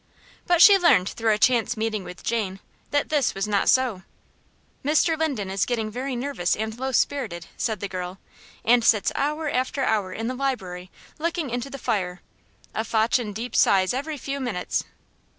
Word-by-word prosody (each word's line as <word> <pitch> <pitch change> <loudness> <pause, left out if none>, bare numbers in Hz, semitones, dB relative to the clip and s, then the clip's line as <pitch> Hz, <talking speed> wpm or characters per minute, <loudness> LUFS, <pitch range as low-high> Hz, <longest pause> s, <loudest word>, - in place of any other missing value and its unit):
But 350 -1 +6
she 405 -2 +9
learned 200 - +4
through 225 -1 0
a 210 - +2
chance 240 0 +2
meeting 215 -2 -1
with 180 - -10
Jane, 205 -5 -2 0.3
that 290 0 0
this 295 -3 +1
was 195 +2 -2
not 205 -2 +2
so. 255 -7 +2 0.8
"Mr. 310 +3 +3
Linden 275 -12 -2
is 195 - 0
getting 225 -3 -1
very 255 +3 -3
nervous 245 -8 -1
and 220 +1 -3
low 265 +1 -2
spirited," 230 -11 0
said 220 -4 -2
the 200 - -2
girl, 185 -1 -5 0.5
"and 235 +1 +5
sits 215 -2 +3
hour 300 +2 -1
after 260 0 -1
hour 210 -6 0
in 225 +4 -4
the 250 - -1
library 195 -10 -3 0.3
looking 330 -4 -2
into 245 +2 -3
the 275 - -7
fire, 190 -8 -2 0.5
a 220 - -1
fotchin' 225 0 +1
deep 230 +5 -6
sighs 190 +1 +4
every 290 +4 -3
few 280 +1 -4
minutes. 245 -9 -2
235 Hz, 175 wpm, -24 LUFS, 200-275 Hz, 0.8 s, she